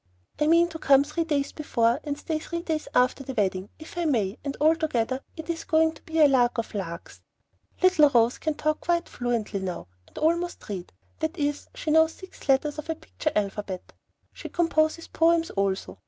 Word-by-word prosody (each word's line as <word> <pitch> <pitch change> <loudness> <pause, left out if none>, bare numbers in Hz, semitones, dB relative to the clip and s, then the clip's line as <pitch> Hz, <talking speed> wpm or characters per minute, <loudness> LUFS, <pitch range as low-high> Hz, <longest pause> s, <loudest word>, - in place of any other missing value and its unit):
I 300 - +2
mean 335 +2 +5
to 325 -1 -8
come 275 -2 +5
three 315 +3 -2
days 285 -3 0
before, 235 -4 +1
and 290 -2 -3
stay 310 +1 -3
three 340 +2 -5
days 315 -3 -2
after 250 +2 +3
the 265 -1 -6
wedding, 190 -3 0
if 320 +2 -8
I 345 - 0
may, 225 -8 0
and 280 -1 -4
altogether 290 -5 +1 0.2
it 320 - -7
is 330 -1 -3
going 320 0 +3
to 315 - -16
be 325 0 -3
a 300 - +8
lark 245 -3 +3
of 230 - -3
larks. 170 -4 -6 0.6
Little 365 -6 +6
Rose 235 -2 +3
can 310 -1 -1
talk 310 +1 0
quite 345 0 0
fluently 235 -4 -2
now, 185 - -5 0.2
and - - -19
almost 340 +3 0
read; 185 -4 -5 0.3
that 315 +3 -2
is, 290 0 -1
she 310 - -2
knows 320 +1 +5
six 375 -6 -13
letters 290 +3 +2
of 305 - -7
her 325 - -1
picture 320 -1 -4
alphabet. 200 -2 -3 0.4
She - - -8
composes 330 -1 +1
poems 330 0 +2
also. 190 - -2
300 Hz, 195 wpm, -26 LUFS, 235-320 Hz, 0.6 s, a